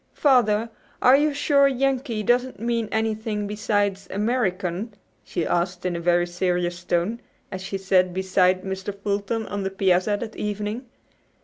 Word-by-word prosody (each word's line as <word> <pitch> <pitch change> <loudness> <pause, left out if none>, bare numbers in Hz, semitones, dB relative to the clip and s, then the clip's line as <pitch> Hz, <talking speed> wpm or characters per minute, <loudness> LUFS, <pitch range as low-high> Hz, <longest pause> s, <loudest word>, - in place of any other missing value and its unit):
"Father, 230 -5 +3 0.3
are 255 - +6
you 300 +2 +3
sure 280 -1 +3
'Yankee' 265 -4 0
doesn't 245 +1 +1
mean 230 -1 -1
anything 220 -1 -1
beside 205 -1 0
'American'?" 205 -2 -1 0.3
she 170 - -3
asked 175 +1 -1
in 180 -1 0
a - - -2
very 175 +1 +2
serious 175 0 -1
tone, 175 +6 -1 0.3
as 190 - -5
she 195 +1 -4
sat 185 -1 +2
beside 185 0 +2
Mr. 190 +1 -5
Fulton 205 +2 -2
on 205 -1 -4
the 195 - -1
piazza 195 +1 +2
that 220 -2 -6
evening. 210 +4 -4
205 Hz, 145 wpm, -24 LUFS, 185-230 Hz, 0.3 s, are